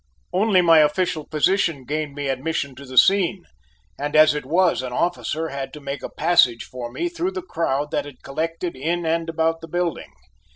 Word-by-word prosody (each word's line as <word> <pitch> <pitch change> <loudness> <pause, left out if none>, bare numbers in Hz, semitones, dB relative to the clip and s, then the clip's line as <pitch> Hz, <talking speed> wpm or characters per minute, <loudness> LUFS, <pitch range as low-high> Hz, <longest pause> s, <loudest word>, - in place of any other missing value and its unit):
Only 190 -1 +3
my 165 -2 +6
official 155 0 +1
position 160 -3 +1
gained 150 0 -3
me 145 -1 -3
admission 140 +1 -2
to 140 +2 -12
the 130 0 -8
scene, 190 0 +4 0.5
and 145 +1 -3
as 155 0 +7
it 150 -3 -5
was, 175 -1 +2
an 130 -1 -5
officer 165 +1 -1
had 135 -1 -5
to 150 - -8
make 140 -1 -5
a - - -6
passage 155 -8 +3
for 120 -2 -7
me 345 - -2
through 350 +2 -3
the 375 -2 -5
crowd 150 - -2
that - - -1
had 145 -3 -13
collected 165 +4 -3
in 165 +6 -2
and 165 +1 0
about 165 0 0
the 165 - -9
building. 175 0 -3
160 Hz, 195 wpm, -22 LUFS, 140-175 Hz, 0.5 s, as